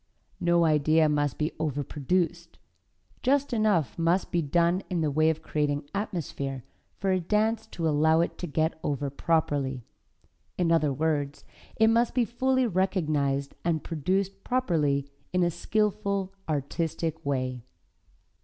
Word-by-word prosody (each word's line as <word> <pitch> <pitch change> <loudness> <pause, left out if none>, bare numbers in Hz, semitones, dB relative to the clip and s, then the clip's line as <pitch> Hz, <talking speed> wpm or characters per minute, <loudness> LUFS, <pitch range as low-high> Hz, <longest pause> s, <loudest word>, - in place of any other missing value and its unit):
No 170 -1 +3
idea 155 +1 +4
must 145 -2 0
be 155 +1 -1
overproduced; 160 +4 -1 0.6
just 275 +1 +2
enough 190 - +1
must 170 +3 +1
be 170 - +2
done 170 +4 +2
in 175 -3 -1
the 155 -2 +1
way 155 +2 +3
of 160 -1 -2
creating 145 -1 -1
atmosphere 145 - -3 0.3
for 195 -1 0
a 185 - +2
dance 220 +5 0
to 165 -6 -3
allow 160 +1 +3
it 170 - -1
to 175 - -3
get 160 +2 0
over 140 -1 -2
properly. 140 -4 0 0.7
In 175 -2 +2
other 155 -3 +3
words, 145 0 -1 0.3
it 220 0 +4
must 230 +2 +2
be 245 -2 +3
fully 260 +2 +1
realized 155 - 0
and 165 -2 0
produced 190 +5 -1
properly, 155 - +1 0.3
in 180 -1 +3
a 175 - +2
skillful, 200 +1 -1 0.2
artistic 160 +2 -2
way. 130 -3 -2
165 Hz, 135 wpm, -27 LUFS, 145-190 Hz, 0.7 s, idea